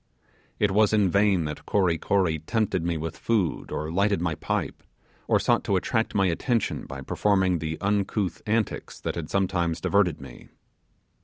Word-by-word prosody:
It 105 Hz, -2 st, +2 dB
was 105 Hz, +2 st, +3 dB
in 100 Hz, -4 st, +3 dB
vain 100 Hz, -4 st, +3 dB
that 75 Hz, 0 st, -6 dB
Kory 90 Hz, -5 st, +2 dB
Kory 90 Hz, -5 st, +1 dB
tempted 95 Hz, +1 st, -1 dB
me 85 Hz, -1 st, -1 dB
with 80 Hz, +1 st, -4 dB
food, 105 Hz, -9 st, -1 dB
or 75 Hz, +1 st, -3 dB
lighted 100 Hz, +2 st, +2 dB
my 85 Hz, -1 st, -1 dB
pipe, -, -, -3 dB, 0.5 s
or -, -, +3 dB
sought -, -, +2 dB
to 100 Hz, -, +1 dB
attract 110 Hz, +4 st, 0 dB
my 95 Hz, -1 st, +3 dB
attention 110 Hz, +6 st, -1 dB
by 65 Hz, +1 st, -7 dB
performing 95 Hz, +3 st, +1 dB
the 80 Hz, 0 st, -4 dB
uncouth 100 Hz, -2 st, -1 dB
antics 110 Hz, -1 st, -1 dB
that -, -, -3 dB
had 80 Hz, -3 st, -5 dB
sometimes 90 Hz, -4 st, 0 dB
diverted 90 Hz, -3 st, +2 dB
me. 65 Hz, -3 st, -12 dB
95 Hz, 165 wpm, -26 LUFS, 80-105 Hz, 0.5 s, was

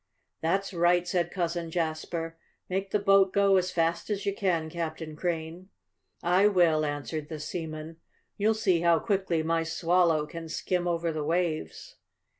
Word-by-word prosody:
"That's 195 Hz, +5 st, 0 dB
right," 175 Hz, +1 st, +3 dB
said 175 Hz, -2 st, 0 dB
Cousin 170 Hz, -2 st, -2 dB
Jasper. 165 Hz, 0 st, -3 dB, 0.4 s
"Make 195 Hz, +1 st, -1 dB
the 210 Hz, -, +2 dB
boat 195 Hz, -1 st, +4 dB
go 200 Hz, -1 st, +4 dB
as 185 Hz, 0 st, +1 dB
fast 170 Hz, 0 st, 0 dB
as 205 Hz, -2 st, -2 dB
you 200 Hz, -, +1 dB
can, 175 Hz, -5 st, 0 dB
Captain 160 Hz, -1 st, -5 dB
Crane." 170 Hz, +2 st, -4 dB, 0.5 s
"I 180 Hz, +4 st, +4 dB
will," 170 Hz, -6 st, +3 dB
answered 145 Hz, 0 st, -4 dB
the 155 Hz, -2 st, -5 dB
seaman. 160 Hz, 0 st, -6 dB, 0.4 s
"You'll 215 Hz, +2 st, +2 dB
see 190 Hz, -6 st, +2 dB
how 170 Hz, -1 st, +4 dB
quickly 190 Hz, -4 st, 0 dB
my 165 Hz, +1 st, +1 dB
Swallow 165 Hz, -1 st, +2 dB
can 165 Hz, +1 st, -8 dB
skim 180 Hz, +2 st, -1 dB
over 170 Hz, -1 st, 0 dB
the 155 Hz, -1 st, -3 dB
waves." 160 Hz, -, -2 dB
170 Hz, 155 wpm, -28 LUFS, 160-185 Hz, 0.5 s, boat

